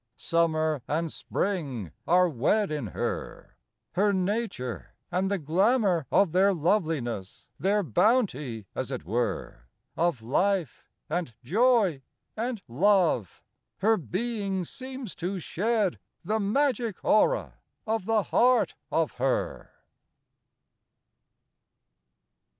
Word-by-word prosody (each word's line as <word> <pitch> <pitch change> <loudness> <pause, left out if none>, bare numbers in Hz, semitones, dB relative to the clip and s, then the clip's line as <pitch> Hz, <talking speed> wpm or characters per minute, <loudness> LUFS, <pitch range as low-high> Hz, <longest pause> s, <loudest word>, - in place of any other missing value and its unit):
III 115 +1 -53
Summer 160 -3 +1
and 160 +2 -1
spring 140 - -3 0.2
are 180 +1 +5
wed 170 - +1
In 150 -7 -2
her - - -5 0.4
her 205 +2 +2
nature; 185 - -2 0.2
and 185 +2 0
the 200 - +1
glamour 185 - +2
of 195 +3 +4
Their 190 +3 +4
loveliness, 155 - -1
their 205 +2 +2
bounty, 150 - +1
as - - -3
it - - -5
were, 100 - -2 0.3
Of 165 -8 0
life, 180 - 0 0.2
and 160 -7 -3
joy, 205 - +3 0.3
and 230 -2 -3
love, 170 - +2 0.3
Her 220 +3 +3
being 195 - -2
seems 260 +1 -7
to 180 +3 -3
shed, 205 +3 0 0.2
The 215 +5 0
magic 235 0 0
aura 485 - +2 0.3
of 220 -3 -1
the 225 -2 +3
heart 250 +2 +3 0.2
of 165 -2 +1
her. 135 0 -1
180 Hz, 105 wpm, -27 LUFS, 145-210 Hz, 0.4 s, are